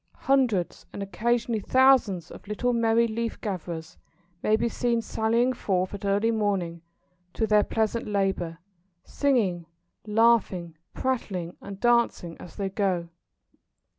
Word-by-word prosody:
Hundreds, 250 Hz, -10 st, +1 dB
and 200 Hz, -, -5 dB
occasionally 230 Hz, +4 st, 0 dB
thousands, 230 Hz, -8 st, +3 dB
of -, -, -12 dB
little 245 Hz, +4 st, 0 dB
merry 230 Hz, 0 st, +3 dB
leaf 230 Hz, 0 st, -3 dB
gatherers 170 Hz, -5 st, -5 dB, 0.4 s
may 215 Hz, -, +3 dB
be 235 Hz, +2 st, 0 dB
seen 235 Hz, 0 st, 0 dB
sallying 230 Hz, +3 st, +1 dB
forth 185 Hz, -5 st, -1 dB
at 200 Hz, 0 st, -6 dB
early 205 Hz, +3 st, +2 dB
morning 195 Hz, -6 st, -1 dB, 0.5 s
to 225 Hz, -, +1 dB
their 210 Hz, -1 st, +4 dB
pleasant 220 Hz, +2 st, -1 dB
labour, 195 Hz, -5 st, -1 dB, 0.5 s
singing, 205 Hz, -, 0 dB, 0.4 s
laughing, 210 Hz, -6 st, +2 dB, 0.2 s
prattling, 195 Hz, -10 st, -2 dB
and 195 Hz, -1 st, -8 dB
dancing 235 Hz, -8 st, +2 dB
as 175 Hz, -, -11 dB
they 200 Hz, -, -2 dB
go. 190 Hz, -3 st, -1 dB
210 Hz, 125 wpm, -26 LUFS, 185-235 Hz, 0.5 s, their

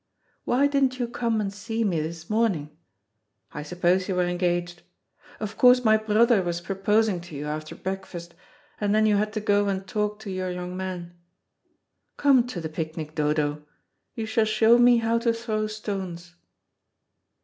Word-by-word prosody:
Why 260 Hz, +3 st, +3 dB
didn't 275 Hz, -3 st, +2 dB
you 245 Hz, -2 st, -1 dB
come 235 Hz, -2 st, -1 dB
and 200 Hz, -2 st, -2 dB
see 225 Hz, +3 st, -3 dB
me 175 Hz, -7 st, 0 dB
this 165 Hz, +1 st, -6 dB
morning? 205 Hz, -10 st, 0 dB, 0.8 s
I 150 Hz, -, -6 dB
suppose 180 Hz, +4 st, 0 dB
you 190 Hz, -, 0 dB
were 180 Hz, 0 st, +2 dB
engaged. 175 Hz, 0 st, -1 dB, 0.6 s
Of 215 Hz, 0 st, -6 dB
course 250 Hz, 0 st, +6 dB
my 220 Hz, 0 st, +6 dB
brother 220 Hz, 0 st, +3 dB
was 175 Hz, -1 st, -2 dB
proposing 195 Hz, +1 st, +1 dB
to 175 Hz, -3 st, -11 dB
you 145 Hz, +1 st, -5 dB
after 155 Hz, +1 st, -5 dB
breakfast, 190 Hz, -3 st, -6 dB, 0.5 s
and 205 Hz, 0 st, +1 dB
then 215 Hz, 0 st, +4 dB
you 210 Hz, -1 st, +3 dB
had 210 Hz, +1 st, 0 dB
to 215 Hz, -, -1 dB
go 205 Hz, -1 st, +2 dB
and 195 Hz, -1 st, -2 dB
talk 210 Hz, +1 st, -1 dB
to 205 Hz, -3 st, -6 dB
your 185 Hz, 0 st, -3 dB
young 180 Hz, 0 st, -5 dB
man. 180 Hz, -2 st, -5 dB, 1.0 s
Come 265 Hz, -4 st, +4 dB
to 220 Hz, -8 st, -5 dB
the 165 Hz, -, -4 dB
picnic, 155 Hz, 0 st, -5 dB
Dodo. 150 Hz, -1 st, 0 dB, 0.5 s
You 225 Hz, -, -3 dB
shall 220 Hz, 0 st, +1 dB
show 220 Hz, +2 st, +4 dB
me 245 Hz, 0 st, +6 dB
how 230 Hz, 0 st, +1 dB
to 230 Hz, 0 st, +2 dB
throw 220 Hz, -2 st, -2 dB
stones." 190 Hz, -5 st, -6 dB
200 Hz, 170 wpm, -25 LUFS, 175-220 Hz, 1.0 s, course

